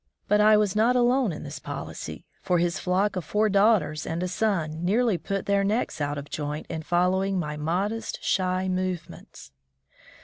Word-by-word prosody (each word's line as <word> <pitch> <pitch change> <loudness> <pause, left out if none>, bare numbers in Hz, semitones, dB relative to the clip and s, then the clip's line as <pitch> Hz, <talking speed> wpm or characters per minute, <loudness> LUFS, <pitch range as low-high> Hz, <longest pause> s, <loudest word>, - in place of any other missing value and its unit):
But 210 0 +4
I 215 0 +6
was 210 -2 +1
not 230 +4 +3
alone 245 -2 +3
in 150 - -7
this 145 0 -7
policy, 140 -1 -7 0.2
for 180 - +1
his 170 0 0
flock 190 +3 +1
of 185 - -2
four 215 +6 +1
daughters 195 -7 +2
and 165 +2 -2
a - - -1
son 175 -5 -1
nearly 220 +3 +2
put 195 -1 -3
their 200 0 +2
necks 205 -5 -1
out 145 0 -1
of 140 0 -6
joint 150 0 -4
in 160 -1 -3
following 185 +4 +1
my 150 -4 -2
modest, 185 +9 -2
shy 185 0 0
movements. 185 - -4
185 Hz, 175 wpm, -26 LUFS, 160-210 Hz, 0.2 s, I